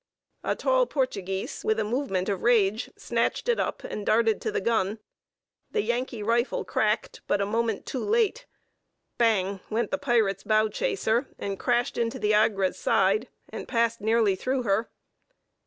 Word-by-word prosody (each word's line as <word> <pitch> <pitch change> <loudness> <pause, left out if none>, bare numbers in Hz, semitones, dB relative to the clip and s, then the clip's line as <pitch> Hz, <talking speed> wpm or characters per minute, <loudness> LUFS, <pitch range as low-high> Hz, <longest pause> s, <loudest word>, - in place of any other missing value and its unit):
A - - 0
tall - - +2
Portuguese, 195 -9 -2
with 220 0 +1
a - - +1
movement 210 -5 -1
of 195 -3 -1
rage, 220 -2 +2
snatched - - -1
it 475 - +2
up, - - -2
and 210 - -5
darted 225 +1 +2
to 435 - -2
the 425 - 0
gun; 220 - 0 0.7
the 430 - 0
Yankee 240 -2 -2
rifle 235 +3 0
cracked, 215 0 -1
but - - +1
a 200 - +1
moment 225 0 -1
too 260 - -4
late. 465 +3 +1 0.7
Bang! 200 -4 +2
went 225 0 -1
the 285 - -1
pirate's 225 -8 +1
bow 215 0 +3
chaser, 280 - 0
and 195 -1 -4
crashed 245 -1 0
into 230 -1 -1
the 210 0 +1
Agra's 205 -3 +2
side, 210 +6 +2 0.2
and - - -7
passed 230 -1 +1
nearly 220 -2 +3
through 255 +6 -1
her. 220 +1 0
225 Hz, 160 wpm, -26 LUFS, 205-250 Hz, 0.7 s, bow